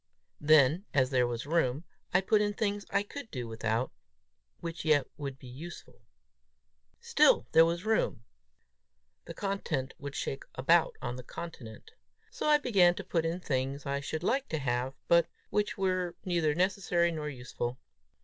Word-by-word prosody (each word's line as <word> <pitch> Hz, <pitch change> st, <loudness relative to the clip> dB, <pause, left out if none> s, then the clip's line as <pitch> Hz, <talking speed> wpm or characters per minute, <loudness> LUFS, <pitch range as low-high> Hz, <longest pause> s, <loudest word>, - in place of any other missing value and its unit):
Then, 155 Hz, +4 st, +5 dB
as 135 Hz, -1 st, +3 dB
there 125 Hz, -2 st, +3 dB
was 120 Hz, +1 st, -4 dB
room, 150 Hz, -2 st, +1 dB, 0.3 s
I 180 Hz, -, +4 dB
put 210 Hz, +2 st, +3 dB
in 205 Hz, 0 st, 0 dB
things 205 Hz, -1 st, -1 dB
I 200 Hz, -, +1 dB
could 240 Hz, +3 st, -8 dB
do 125 Hz, -, -5 dB
without, 115 Hz, +2 st, -1 dB, 0.7 s
which 170 Hz, 0 st, -5 dB
yet 155 Hz, -3 st, +4 dB
would 140 Hz, -2 st, -5 dB
be 135 Hz, -, -15 dB
useful. 145 Hz, +8 st, -10 dB, 1.0 s
Still -, -, +4 dB
there 165 Hz, 0 st, +7 dB
was 170 Hz, +3 st, -2 dB
room; 220 Hz, -, +1 dB, 1.0 s
the -, -, -8 dB
content 195 Hz, -9 st, -2 dB
would 140 Hz, 0 st, -6 dB
shake 135 Hz, -, -3 dB
about 165 Hz, +6 st, +3 dB
on 120 Hz, 0 st, -3 dB
the 125 Hz, -, -8 dB
continent! 125 Hz, -7 st, -9 dB, 0.4 s
So -, -, -3 dB
I 300 Hz, 0 st, +6 dB
began 195 Hz, -11 st, +4 dB
to 200 Hz, -, -6 dB
put 170 Hz, -3 st, 0 dB
in 170 Hz, +3 st, -2 dB
things 135 Hz, -1 st, -2 dB
I 140 Hz, 0 st, -1 dB
should 155 Hz, +3 st, -4 dB
like 265 Hz, +8 st, 0 dB
to 160 Hz, -, -1 dB
have, 130 Hz, -1 st, -1 dB
but 170 Hz, -1 st, +5 dB, 0.2 s
which 210 Hz, 0 st, 0 dB
were 185 Hz, -2 st, 0 dB
neither 170 Hz, -5 st, +1 dB
necessary 180 Hz, -1 st, +2 dB
nor 155 Hz, -2 st, -4 dB
useful. 125 Hz, -2 st, -5 dB
160 Hz, 160 wpm, -30 LUFS, 130-185 Hz, 1.0 s, there